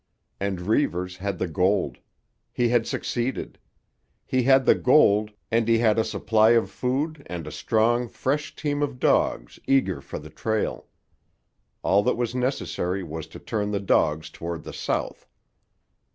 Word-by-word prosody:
And 95 -2 -2
Reivers 90 -4 0
had 100 0 -3
the 90 - -1
gold. 95 +4 0 0.5
He 120 -1 +1
had 120 -1 +2
succeeded. 120 +2 -3 0.7
He 130 - +1
had 135 +1 +4
the - - +7
gold, 105 -6 +4 0.2
and 115 0 +2
he 115 0 +4
had 115 -1 +3
a - - +3
supply 110 +1 +3
of 115 - -1
food 140 +4 -2
and 85 -3 -5
a - - -7
strong, 120 +2 +1
fresh 140 +6 -2
team 145 -1 -2
of 140 -3 -2
dogs - - +1
eager 95 - +2
for - - -7
the 75 +1 -10
trail. 110 -1 -2 1.0
All 100 +2 +4
that 125 +4 0
was 120 -1 -1
necessary 110 -7 -2
was 80 -1 -6
to - - -11
turn 105 -1 -3
the 100 -1 -1
dogs 80 -5 +1
toward 85 -1 -6
the - - -8
south. - - -3
110 Hz, 155 wpm, -25 LUFS, 90-125 Hz, 1.0 s, the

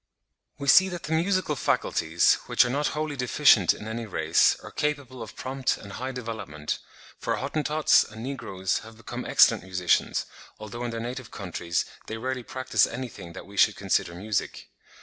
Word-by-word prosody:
We 140 -1 -6
see 190 +7 +7
that 175 -3 -6
the 150 +3 -3
musical 175 -1 +1
faculties, 85 - +2
which - - +4
are 120 - -1
not 145 +3 0
wholly 155 -1 -2
deficient 125 - +5
in 105 - -6
any 115 0 -4
race, 80 -4 +3
are - - -9
capable 140 -4 -3
of 110 - -8
prompt 130 0 -1
and 100 - -11
high 130 +5 -4
development, 110 - -5 0.4
for - - -1
Hottentots 150 +2 +2
and 110 +1 -10
Negroes 95 -8 -2
have 110 0 -13
become 115 - -7
excellent - - +5
musicians, 90 0 +1 0.3
although 110 +3 -7
in - - -2
their 115 0 -4
native 120 +1 -5
countries 85 -3 -3 0.2
they 110 - -4
rarely 130 +2 -3
practise 130 +2 +1
anything 115 -8 -7
that 95 - -9
we 100 +1 -13
should - - +5
consider 85 - 0
music. 105 +3 -3
120 Hz, 170 wpm, -26 LUFS, 100-140 Hz, 0.4 s, see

